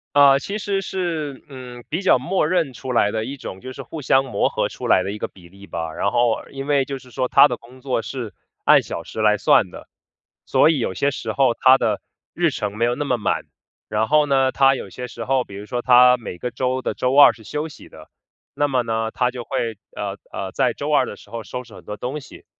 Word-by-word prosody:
呃， 140 Hz, -1 st, +7 dB
其 200 Hz, +8 st, -4 dB
实 200 Hz, -2 st, -1 dB
是， 165 Hz, -7 st, -4 dB
嗯， 125 Hz, -2 st, -10 dB
比 165 Hz, +5 st, -2 dB
较 185 Hz, -, +5 dB
默 155 Hz, +4 st, 0 dB
认 165 Hz, -7 st, 0 dB
出 130 Hz, 0 st, -6 dB
来 105 Hz, -4 st, +3 dB
的 110 Hz, 0 st, -2 dB
一 140 Hz, +2 st, -6 dB
种， 95 Hz, -6 st, -8 dB
就 130 Hz, 0 st, -8 dB
是 -, -, -8 dB
互 160 Hz, -, -8 dB
相 135 Hz, +1 st, +3 dB
磨 130 Hz, -, 0 dB
合 -, -, -1 dB
出 -, -, -7 dB
来 90 Hz, -, +4 dB
的 100 Hz, -, -3 dB
一 105 Hz, -, -7 dB
个 -, -, -2 dB
比 85 Hz, -3 st, -17 dB
例 100 Hz, +1 st, -15 dB
吧。 80 Hz, -1 st, -4 dB
然 100 Hz, -, 0 dB
后 120 Hz, -2 st, +1 dB
因 135 Hz, 0 st, -6 dB
为 140 Hz, -2 st, +2 dB
就 135 Hz, +1 st, -5 dB
是 130 Hz, -1 st, -16 dB
说 130 Hz, +1 st, -1 dB
她 -, -, +7 dB
的 125 Hz, -, -4 dB
工 125 Hz, +2 st, -17 dB
作 130 Hz, -3 st, -1 dB
是 120 Hz, -2 st, -6 dB, 0.3 s
按 -, -, +6 dB
小 -, -, -6 dB
时 110 Hz, -, -6 dB
来 105 Hz, -1 st, +4 dB
算 130 Hz, -9 st, +4 dB
的， -, -, -12 dB, 0.6 s
所 160 Hz, -, +5 dB
以 145 Hz, -, -1 dB
有 95 Hz, -5 st, -2 dB
些 140 Hz, 0 st, +1 dB
时 -, -, -4 dB
候 130 Hz, -4 st, +3 dB
她 130 Hz, +2 st, +5 dB
的 105 Hz, -5 st, -1 dB, 0.3 s
日 170 Hz, -1 st, +2 dB
程 105 Hz, -6 st, -4 dB
没 115 Hz, +2 st, +1 dB
有 120 Hz, 0 st, +1 dB
那 145 Hz, -, -3 dB
么 125 Hz, -3 st, +1 dB
满， 105 Hz, -, -1 dB, 0.4 s
然 110 Hz, +1 st, 0 dB
后 150 Hz, 0 st, +4 dB
呢， 135 Hz, -2 st, +2 dB
她 135 Hz, 0 st, +4 dB
有 100 Hz, -, -6 dB
些 125 Hz, +6 st, -7 dB
时 115 Hz, -2 st, -7 dB
候， 130 Hz, -1 st, +1 dB
比 100 Hz, -, -14 dB
如 105 Hz, +1 st, -8 dB
说 120 Hz, -1 st, -3 dB
她 125 Hz, 0 st, +7 dB
每 95 Hz, -6 st, -8 dB
个 125 Hz, -, -3 dB
周 130 Hz, +1 st, -1 dB
的 -, -, -3 dB
周 130 Hz, +2 st, 0 dB
二 145 Hz, -, +9 dB
是 110 Hz, -, -16 dB
休 150 Hz, +7 st, -4 dB
息 150 Hz, -, -13 dB
的。 -, -, -15 dB, 0.5 s
那 145 Hz, -, +2 dB
么 130 Hz, -3 st, +1 dB
呢， 115 Hz, -1 st, -2 dB
她 125 Hz, -1 st, +1 dB
就 125 Hz, -1 st, -7 dB
会， 115 Hz, -5 st, -3 dB, 0.2 s
呃， 100 Hz, -1 st, -4 dB
呃， 95 Hz, -1 st, -5 dB
在 -, -, +1 dB
周 145 Hz, +1 st, -4 dB
二 135 Hz, -3 st, +4 dB
的 -, -, -7 dB
时 -, -, -17 dB
候 115 Hz, 0 st, -6 dB
收 125 Hz, +3 st, -6 dB
拾 115 Hz, -3 st, -15 dB
很 -, -, -14 dB
多 105 Hz, -, -6 dB
东 135 Hz, +5 st, -4 dB
西， 135 Hz, -, -14 dB
125 Hz, 275 characters per minute, -21 LUFS, 115-140 Hz, 0.6 s, 二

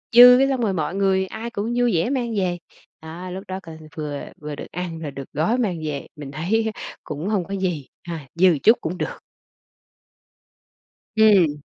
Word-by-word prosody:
dư 250 Hz, +1 st, +11 dB
cái 270 Hz, -, +4 dB
xong 260 Hz, -3 st, 0 dB
rồi 205 Hz, -4 st, +1 dB
mọi 165 Hz, +2 st, -2 dB
người 190 Hz, -1 st, +2 dB
ai 225 Hz, +4 st, -6 dB
cũng 225 Hz, +2 st, -3 dB
vui 245 Hz, -4 st, +3 dB
vẻ 165 Hz, +9 st, +1 dB
mang 240 Hz, -5 st, -1 dB
về, 180 Hz, -2 st, 0 dB, 0.4 s
đó, 170 Hz, +3 st, -8 dB
lúc 190 Hz, +2 st, -6 dB
đó 190 Hz, 0 st, -4 dB
coi 160 Hz, -2 st, -10 dB, 0.2 s
vừa 150 Hz, -2 st, -4 dB, 0.2 s
vừa 150 Hz, -1 st, -5 dB
được -, -, -8 dB
ăn, 170 Hz, -2 st, -4 dB
rồi 150 Hz, -3 st, -5 dB
được 135 Hz, -1 st, -9 dB
gói 170 Hz, -, +1 dB
mang 200 Hz, -9 st, 0 dB
về, 145 Hz, -2 st, -4 dB
mình 145 Hz, -2 st, -8 dB
thấy 190 Hz, +10 st, 0 dB
á -, -, -10 dB, 0.2 s
cũng 150 Hz, +5 st, -5 dB
hông 195 Hz, -5 st, 0 dB
có 195 Hz, -, -4 dB
gì, 175 Hz, -8 st, -2 dB, 0.2 s
a, 165 Hz, -5 st, -6 dB
dư 185 Hz, +2 st, +6 dB
một -, -, -1 dB
chút 225 Hz, +3 st, +7 dB
cũng 175 Hz, +3 st, -3 dB
được. -, -, -4 dB, 2.0 s
Ừm. 185 Hz, -9 st, +5 dB
180 Hz, 200 wpm, -23 LUFS, 160-220 Hz, 2.0 s, dư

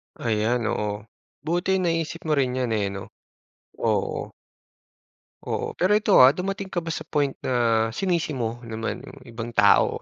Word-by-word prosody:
Ayan, 115 Hz, +1 st, 0 dB
oo. 105 Hz, 0 st, -3 dB, 0.4 s
Buti 175 Hz, +3 st, 0 dB
naisip 165 Hz, -1 st, -1 dB
mo 155 Hz, -, +2 dB
rin 130 Hz, -1 st, 0 dB
'yan, 125 Hz, -3 st, -1 dB
eh, 105 Hz, -2 st, +1 dB
'no? 100 Hz, 0 st, -8 dB, 0.7 s
Oo. -, -, -1 dB, 1.1 s
Oo. -, -, -3 dB
Pero 185 Hz, +3 st, +3 dB
ito, 210 Hz, -1 st, +4 dB
ah, 135 Hz, +3 st, +8 dB
dumating 195 Hz, +3 st, -3 dB
ka 175 Hz, -, -1 dB
ba 165 Hz, -, -6 dB
sa 155 Hz, -1 st, -4 dB
point 145 Hz, -3 st, -1 dB
na 115 Hz, -3 st, +2 dB
sinisi 170 Hz, -3 st, -1 dB
mo 120 Hz, -2 st, -2 dB
naman 115 Hz, 0 st, -4 dB
yung 140 Hz, -, -13 dB
ibang 115 Hz, 0 st, -6 dB
tao 100 Hz, -3 st, +4 dB
130 Hz, 155 wpm, -24 LUFS, 115-165 Hz, 1.1 s, ah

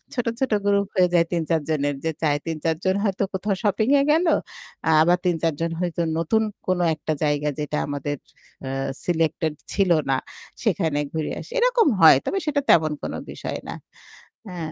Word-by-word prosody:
ছোট, 245 Hz, -2 st, -1 dB
ছোট 260 Hz, -5 st, 0 dB
গ্রুপ 200 Hz, -1 st, +2 dB
হয়ে 180 Hz, -1 st, +5 dB
যায় 170 Hz, -1 st, +4 dB
৩-৪ 165 Hz, -2 st, 0 dB
জনের 145 Hz, -2 st, 0 dB
যে 160 Hz, -, +1 dB
চায় 145 Hz, -2 st, +2 dB
৩-৪ 160 Hz, 0 st, -1 dB
জন 190 Hz, +1 st, +2 dB
হয়তো 200 Hz, -1 st, 0 dB
কোথাও 195 Hz, +1 st, -1 dB
শপিং 215 Hz, +4 st, +1 dB
এ -, -, +2 dB
গেলো, 330 Hz, +2 st, +3 dB, 0.7 s
আবার 175 Hz, +2 st, +4 dB
৩-৪ 165 Hz, -2 st, +1 dB
জন 165 Hz, 0 st, 0 dB
হয়তো 175 Hz, -1 st, -1 dB, 0.2 s
নতুন 220 Hz, +7 st, +1 dB, 0.3 s
কোনো 180 Hz, -1 st, +1 dB
একটা 155 Hz, +1 st, -3 dB
জায়গা 150 Hz, 0 st, +1 dB
যেটা 150 Hz, 0 st, -2 dB
আমাদের 145 Hz, 0 st, -3 dB, 0.5 s
অ্যা 130 Hz, -, -4 dB, 0.3 s
সিলেক্টেড 160 Hz, -2 st, 0 dB, 0.2 s
ছিল 195 Hz, -3 st, +2 dB, 0.2 s
না 130 Hz, -, +3 dB, 0.5 s
সেখানে 165 Hz, -8 st, +1 dB
ঘুরে 160 Hz, -1 st, -2 dB
আসি। -, -, -11 dB
এরকম 485 Hz, -5 st, +3 dB
হয়। 160 Hz, -4 st, +9 dB
তবে 390 Hz, -, -1 dB
সেটা 285 Hz, -1 st, +1 dB
তেমন 155 Hz, -2 st, +5 dB
কোনো -, -, -4 dB
বিষয় -, -, -5 dB
না। -, -, -4 dB, 0.8 s
হ্যাঁ। 165 Hz, -3 st, -5 dB
170 Hz, 170 wpm, -23 LUFS, 155-200 Hz, 0.8 s, হয়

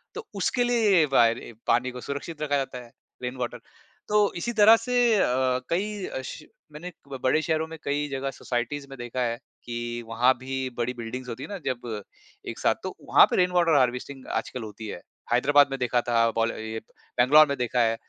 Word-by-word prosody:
तो 450 Hz, -1 st, -7 dB
उसके 225 Hz, +5 st, +1 dB
लिए 240 Hz, -3 st, +2 dB
ये 160 Hz, -4 st, +5 dB
वायर 115 Hz, -2 st, +5 dB
ए 120 Hz, -, -10 dB
पानी 125 Hz, +2 st, +2 dB
को 125 Hz, 0 st, -8 dB
सुरक्षित 145 Hz, +4 st, -6 dB
रखा 145 Hz, -1 st, +1 dB
जाता 135 Hz, -2 st, -3 dB
है 120 Hz, -, -17 dB, 0.3 s
रेन 125 Hz, +1 st, -3 dB
वाटर। 120 Hz, -1 st, -4 dB, 0.5 s
तो 210 Hz, -1 st, +3 dB
इसी 235 Hz, +7 st, -2 dB
तरह 220 Hz, +1 st, +8 dB
से 250 Hz, +2 st, -3 dB, 0.2 s
अ, 195 Hz, -, +3 dB, 0.5 s
कई 200 Hz, +2 st, -1 dB
अ, 130 Hz, -, -5 dB
श 150 Hz, -, -8 dB, 0.3 s
मैंने 170 Hz, +5 st, -8 dB, 0.3 s
बड़े 145 Hz, +5 st, +3 dB
शहरों 160 Hz, 0 st, 0 dB
में 160 Hz, 0 st, -9 dB
कई 145 Hz, +1 st, -1 dB
जगह 135 Hz, 0 st, -3 dB
सोसाइटीज़ 125 Hz, +3 st, -3 dB
में 135 Hz, -, -9 dB
देखा 120 Hz, +1 st, -4 dB
है 115 Hz, -1 st, 0 dB, 0.3 s
कि 120 Hz, 0 st, -4 dB
वहाँ 120 Hz, +3 st, +3 dB
भी 130 Hz, 0 st, -4 dB
बड़ी 120 Hz, +1 st, -1 dB
बिल्डिंग्स 125 Hz, +2 st, -6 dB
होती 120 Hz, +3 st, -6 dB
है -, -, -8 dB
ना 200 Hz, -, -4 dB
जब 120 Hz, -4 st, -3 dB, 0.5 s
एक -, -, -6 dB
साथ, -, -, +2 dB
तो -, -, -5 dB
वहाँ -, -, +8 dB
पे -, -, +1 dB
रेन 180 Hz, 0 st, +3 dB
वाटर 170 Hz, -3 st, +3 dB
हार्वेस्टिंग 130 Hz, +1 st, -1 dB
आजकल 125 Hz, -, -3 dB
होती 110 Hz, 0 st, -8 dB
है, 85 Hz, -, -7 dB, 0.3 s
हैदराबाद 145 Hz, +3 st, +5 dB
में 135 Hz, -, -3 dB
देखा 125 Hz, 0 st, +1 dB
था 115 Hz, -1 st, +3 dB
बाल 115 Hz, 0 st, +2 dB
ये 110 Hz, 0 st, -5 dB, 0.4 s
बैंगलोर 150 Hz, +5 st, +7 dB
में 140 Hz, -1 st, -2 dB
देखा 125 Hz, 0 st, 0 dB
है। 115 Hz, 0 st, +2 dB
130 Hz, 205 wpm, -26 LUFS, 120-155 Hz, 0.5 s, तरह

